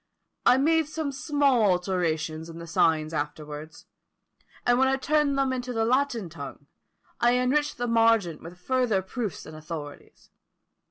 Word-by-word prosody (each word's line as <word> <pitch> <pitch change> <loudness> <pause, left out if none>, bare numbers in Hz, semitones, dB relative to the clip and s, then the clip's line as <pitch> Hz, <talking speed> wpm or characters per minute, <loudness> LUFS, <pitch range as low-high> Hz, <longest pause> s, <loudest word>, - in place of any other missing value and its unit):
I 250 - +7
made 320 +2 +3
some 310 -2 -3
small 275 -2 +2
alterations 175 -5 0
in 165 - -9
the 170 - -8
signs 160 -1 +1
afterwards; 150 +1 -6 0.8
and 245 0 +3
when 265 - +4
I 265 - +2
turned 285 +1 +1
them 270 -1 +1
into 250 -1 -4
the 225 -1 +1
Latin 250 -4 +1
tongue, 145 -3 -9 0.5
I 240 +1 +4
enriched 270 +4 +1
the 245 - -2
margent 225 -8 +2
with 170 +2 -10
further 240 -3 +1
proofs 215 0 -5
and 155 - -10
authorities. 155 -2 -9
225 Hz, 150 wpm, -26 LUFS, 165-265 Hz, 0.8 s, I